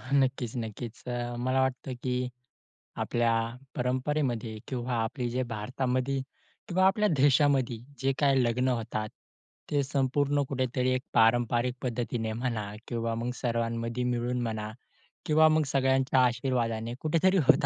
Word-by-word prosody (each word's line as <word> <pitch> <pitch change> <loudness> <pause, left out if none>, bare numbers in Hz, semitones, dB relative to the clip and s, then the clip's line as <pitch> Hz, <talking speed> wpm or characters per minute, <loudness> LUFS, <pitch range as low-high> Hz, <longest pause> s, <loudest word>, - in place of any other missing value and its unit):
हां - - -5
नक्कीच, 130 -3 0
नक्कीच. 115 0 -6 0.4
मला 130 +1 +2
वाटतं 130 0 -2
की 130 - -1 0.9
आपल्या 120 -1 +1 0.4
परंपरेमध्ये 125 -2 -1
किंवा 125 -1 -3
आपले 120 +2 -1
जे 125 +2 -1
भारतामध्ये 130 +4 -1 0.5
किंवा 185 +1 +2
आपल्या 210 +2 +3
देशामध्ये 135 -3 +3 0.2
जे 135 0 +2
काही 135 -3 +4
लग्न 125 +2 +1
होतात, 115 -3 -1 0.6
ते 145 -1 +2
संपूर्ण 140 +1 +1
कुठेतरी 130 -1 0
एक 130 - 0
पारंपरिक 120 +2 +3
पद्धतीने 120 -2 -2
म्हणा 115 -3 -2 0.2
किंवा 115 -1 -2
मग 120 +1 -1
सर्वांमध्ये 115 0 -1
मिळून 120 +1 -1
म्हणा 110 -1 -4 0.5
किंवा 155 +1 +5
मग 155 0 +3
सगळ्यांच्या 130 0 +3
आशीर्वादाने 120 -2 -1
कुठेतरी 170 +5 +3
होत - - +6
125 Hz, 125 wpm, -29 LUFS, 115-135 Hz, 0.9 s, होत